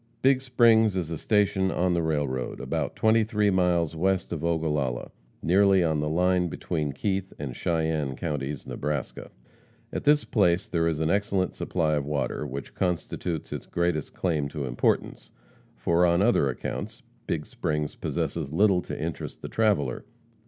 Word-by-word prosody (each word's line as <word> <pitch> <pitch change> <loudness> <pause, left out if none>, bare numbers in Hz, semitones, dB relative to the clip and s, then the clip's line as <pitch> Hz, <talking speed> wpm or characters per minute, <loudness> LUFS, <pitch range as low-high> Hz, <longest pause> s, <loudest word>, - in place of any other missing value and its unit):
Big 135 0 +4
Springs 115 -5 +4
is 85 -3 -2
a 80 - -2
station 100 -3 +2
on 90 -1 +1
the 85 - +1
railroad, 75 -5 -2
about - - -2
twenty 110 0 +4
three 105 -2 +1
miles 85 -3 +2
west 95 +3 0
of 80 -2 -4
Ogallala, 75 -7 -1 0.3
nearly 95 +1 +4
on 80 -2 +1
the 75 0 -1
line 90 +2 +2
between 75 -3 -2
Keith 95 +5 -2
and 70 -4 -5
Cheyenne 80 -5 -1
counties, 75 -3 -4
Nebraska. 75 -2 -4 0.6
At - - -3
this 150 0 +4
place 95 -1 +2
there 85 -5 +1
is 80 -2 0
an 80 +1 +1
excellent 100 -2 +1
supply 80 -4 0
of 75 -2 -1
water, 75 0 -2
which 70 0 -7
constitutes 90 -2 -2
its - - -6
greatest 85 -4 -1
claim 80 -6 0
to 75 -2 -4
importance, - - -1 0.5
for 85 +1 +2
on 85 +2 +4
other 105 - +3
accounts 65 - -5 0.2
Big - - -2
Springs 75 -1 -2
possesses 75 -5 -3
little 95 +2 +3
to - - -6
interest 80 +2 -5
the - - -5
traveller. 100 - +1
85 Hz, 160 wpm, -26 LUFS, 75-95 Hz, 0.6 s, Big